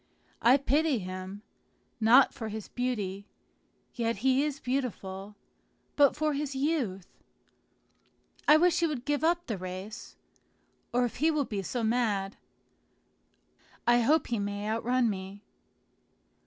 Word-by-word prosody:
I 250 +4 +6
pity 285 +1 +1
him, 185 +1 -7 0.6
not 235 +5 +6
for 220 -2 -6
his 215 -1 -6
beauty 205 -6 -3 0.7
(yet 230 -1 -1
he 265 +1 +4
is 295 -2 -3
beautiful), 210 -7 -4 0.6
but 285 -2 +5
for 305 0 0
his 280 -1 -3
youth. 265 - -1 1.4
I 300 - +8
wish 350 +1 +3
he 340 - +2
would 275 -5 -4
give 290 0 0
up 345 +1 +2
the 215 -5 -4
race, 185 +4 -7 0.8
or 245 0 +2
if 240 - -5
he 310 +5 +3
will 305 -3 +1
be 205 -4 -3
so 235 +5 -3
mad, 220 -4 0 1.5
I 240 0 +5
hope 290 +6 +3
he 235 -3 -2
may 205 +1 -3
outrun 235 +3 +1
me." 195 0 -5
240 Hz, 130 wpm, -29 LUFS, 205-280 Hz, 1.5 s, I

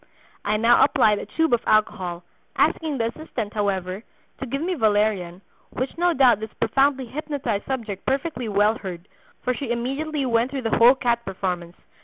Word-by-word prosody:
I 210 +1 +1
now 230 +2 +5
applied 210 -1 +3
a - - -7
tube 320 -4 0
of 235 - +3
alcohol, 185 -5 +1 0.3
asking 310 -4 +1
the 230 -1 0
assistant, 235 -9 -5
however, 195 -1 -2 0.4
to 265 - -5
give 275 +3 -2
me 365 +2 -1
valerian, 205 - +1 0.3
which 255 +2 -4
no 350 +1 +2
doubt 255 -8 +4
this 220 0 -6
profoundly 270 -1 +1
hypnotized 265 -5 -3
subject 225 -7 -4
perfectly 265 -3 -1
well 210 +2 +2
heard, 180 -1 -7 0.4
for 250 - +1
she 260 0 -5
immediately 275 +5 -2
went 235 0 +1
through 270 -1 -4
the 225 - +1
whole 240 +3 +7
cat 235 -2 0
performance. 180 -3 -4
230 Hz, 170 wpm, -23 LUFS, 205-270 Hz, 0.4 s, whole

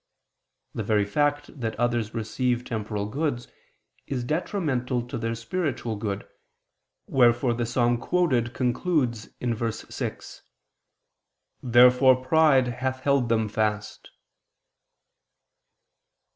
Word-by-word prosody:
The - - -3
very 105 -2 +1
fact 145 +6 -1
that 115 -2 -3
others 120 -3 0
receive 120 +2 -1
temporal 105 -2 -3
goods, 125 +2 -2 0.6
is 125 -3 -2
detrimental 130 - -1
to - - -6
their 115 0 -2
spiritual 120 -1 -3
good; 100 -1 -4 0.8
wherefore 120 -1 +3
the 120 0 -2
psalm 120 0 +1
quoted 130 -7 +1
concludes 125 -3 0
(verse 115 -2 -2
6): - - -6 1.2
"Therefore 125 +2 +6
pride 145 -3 +4
hath 130 0 -2
held 140 -4 +2
them 110 -1 +2
fast." 105 0 -2
120 Hz, 100 wpm, -26 LUFS, 115-130 Hz, 1.2 s, Therefore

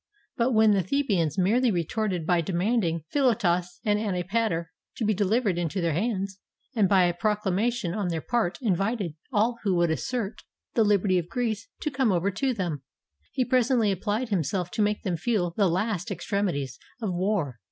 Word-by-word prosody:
But 245 +2 +1
when 220 -1 +5
the 200 -2 +3
The 275 - 0
bans 180 - 0
merely 230 +7 +3
retorted 185 -1 -1
by 175 0 +3
demanding 175 -2 0
Philotas 180 -10 +1
and 210 -1 +2
Anti 190 -5 -1
pater 180 -5 -1 0.2
to 225 - -2
be 215 - +3
delivered 205 -1 +1
into 175 +2 -2
their 170 -3 +1
hands, 195 +1 -2 0.4
and 205 -5 +3
by 190 -2 +5
a 175 -1 +2
procla 210 +1 0
mation 210 -3 0
on 205 -4 -1
their 165 -2 -1
part 220 0 -1
invited 200 -3 0 0.2
all 230 +1 +1
who 195 -3 +1
would 170 -1 +2
assert 235 +4 -3 0.3
the 225 - +4
Hberty 200 -3 +3
of 170 0 -6
Greece 225 -3 -2
to 300 - -1
come 260 -4 +2
over 185 +2 +1
to 260 +7 0
them, 175 - -3 0.5
he 255 - 0
presently 245 -3 +3
applied 210 +5 -1
himself 180 -1 -1
to - - -1
make 210 0 +1
them 180 -3 -1
feel 175 -1 0
the 200 -4 +3
last 190 +2 -1
extremities 180 - -2 0.2
of 215 -6 -2
war. 175 - -1
200 Hz, 185 wpm, -26 LUFS, 175-225 Hz, 0.5 s, when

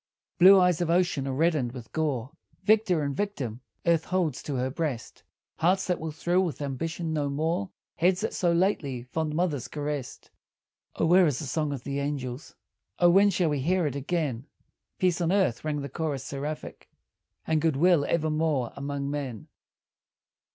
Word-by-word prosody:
Blue 190 +2 +9
waves 180 -2 +3
of 170 - 0
ocean 170 -5 +1
are - - -1
reddened 150 -4 +1
with 120 -3 -10
gore, 145 -5 -1 0.3
Victor 210 -7 +3
and 140 -1 -2
victim 135 - -3 0.2
earth 165 -2 +3
holds 175 -7 -1
to 145 - -4
her 130 +1 -1
breast; 135 -6 -4 0.4
Hearts 185 +4 +2
that 180 - -1
will 160 0 -4
thrill 175 +4 +1
with 165 -8 -2
ambition 160 +4 -3
no 145 -2 0
more; 165 +7 -1 0.3
Heads 180 +2 +2
that 220 - -2
so 175 -2 +1
lately 165 -8 0
fond 155 +4 -3
mothers 160 -7 -1
caressed. 145 -3 -5 0.6
O - - +1
where 180 +2 +6
is 140 -4 0
the 155 - -4
song 150 +2 -1
of 135 -3 -5
the 140 0 -3
angels? 140 -2 -4 0.4
O 175 -1 +5
when 200 +3 +6
shall 175 -3 +1
we 145 - 0
hear 175 +5 +1
it 145 - -2
again? 140 -3 -2 0.5
"Peace 180 -1 +1
on 170 0 +1
earth," 185 - +1
rang 150 -1 -2
the 140 - -4
chorus 140 -1 -3
seraphic, 145 +3 -6 0.6
"And 160 -1 +1
good 160 -3 +2
will 170 +1 +4
evermore 155 -5 0
among 140 0 -3
men." 135 -7 -5
155 Hz, 170 wpm, -27 LUFS, 140-175 Hz, 0.6 s, Blue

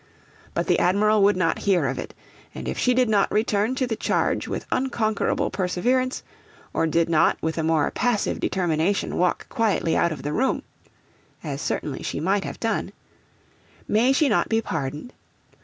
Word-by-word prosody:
But - - 0
the - - +2
Admiral 210 +4 +3
would 200 0 +4
not 165 -3 +1
hear 175 -6 +3
of 135 0 -2
it; - - -7 0.4
and - - -6
if - - -2
she 250 -1 +2
did 255 -1 +3
not 205 -2 +2
return 215 +2 +1
to 260 - 0
the 235 -2 -2
charge - - 0
with - - -4
unconquerable 230 -5 0
perseverance, 245 +8 0 0.5
or 165 - +1
did 165 +1 +2
not 165 -2 +3
with 160 +1 -2
a - - 0
more 160 -2 +2
passive 245 -4 0
determination 175 +1 0
walk 180 0 0
quietly 210 -7 +1
out 170 - +2
of 150 -4 -6
the 145 +1 -2
room 265 +8 0 0.8
(as 145 -3 -4
certainly 140 -3 -3
she - - -3
might 195 +5 0
have - - -6
done), 225 -1 -2 0.9
may 235 +5 +3
she 290 +2 +3
not 220 - +1
be 225 - +2
pardoned? 160 - -4
200 Hz, 175 wpm, -24 LUFS, 165-225 Hz, 0.9 s, would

